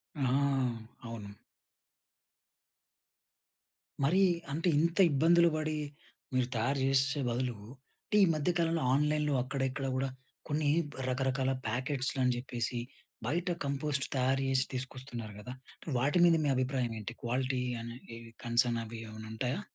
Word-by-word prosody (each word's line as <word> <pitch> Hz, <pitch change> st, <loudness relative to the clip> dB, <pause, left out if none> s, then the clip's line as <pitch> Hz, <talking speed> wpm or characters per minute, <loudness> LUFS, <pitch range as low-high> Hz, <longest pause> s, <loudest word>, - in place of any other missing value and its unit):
ఆ! 145 Hz, -, -2 dB, 0.8 s
అవును. 110 Hz, -3 st, -7 dB, 2.7 s
మరీ, 185 Hz, +8 st, +4 dB, 0.3 s
అంటే 165 Hz, +5 st, +1 dB
ఇంత 170 Hz, +3 st, 0 dB
ఇబ్బందులు 170 Hz, +4 st, +5 dB
పడి, 155 Hz, 0 st, -1 dB, 0.6 s
మీరు 130 Hz, -1 st, +2 dB
తయారు 130 Hz, +5 st, +1 dB
జేషేషే 135 Hz, +2 st, +2 dB
బదులు, 120 Hz, 0 st, -1 dB, 0.5 s
అంటే, 210 Hz, -, +1 dB
ఈ -, -, +8 dB
మధ్య 155 Hz, +3 st, 0 dB
కాలంలో 165 Hz, -3 st, +1 dB
ఆన్లైన్‍లో 150 Hz, +1 st, +2 dB
అక్కడిక్కడ 135 Hz, +1 st, -2 dB
గూడా, 135 Hz, +1 st, 0 dB, 0.4 s
కొన్ని 145 Hz, 0 st, +1 dB, 0.4 s
రకరకాల 130 Hz, 0 st, +1 dB, 0.2 s
ప్యాకెట్స్‌‌లని 130 Hz, 0 st, +1 dB
జెప్పేసి, 120 Hz, -1 st, -3 dB, 0.5 s
బయట 170 Hz, +7 st, 0 dB, 0.2 s
కంపోస్ట్ 140 Hz, 0 st, -1 dB
తయారు 135 Hz, +1 st, +2 dB
జేసి 130 Hz, -1 st, +2 dB
తీసుకొస్తున్నారు 125 Hz, -4 st, -5 dB
గదా! 125 Hz, +4 st, -7 dB, 0.5 s
వాటి 145 Hz, +7 st, +2 dB
మీద 170 Hz, -1 st, +6 dB
మీ -, -, +2 dB
అభిప్రాయమేంటి? 120 Hz, -4 st, -1 dB
క్వాలిటీ 125 Hz, +1 st, 0 dB, 0.2 s
అనే 115 Hz, +1 st, -7 dB, 0.2 s
ఈ -, -, -8 dB, 0.3 s
కన్సర్నవీ 115 Hz, -1 st, +1 dB
ఏమన్నుంటాయా? 110 Hz, -, -3 dB
130 Hz, 110 wpm, -32 LUFS, 120-145 Hz, 2.7 s, ఈ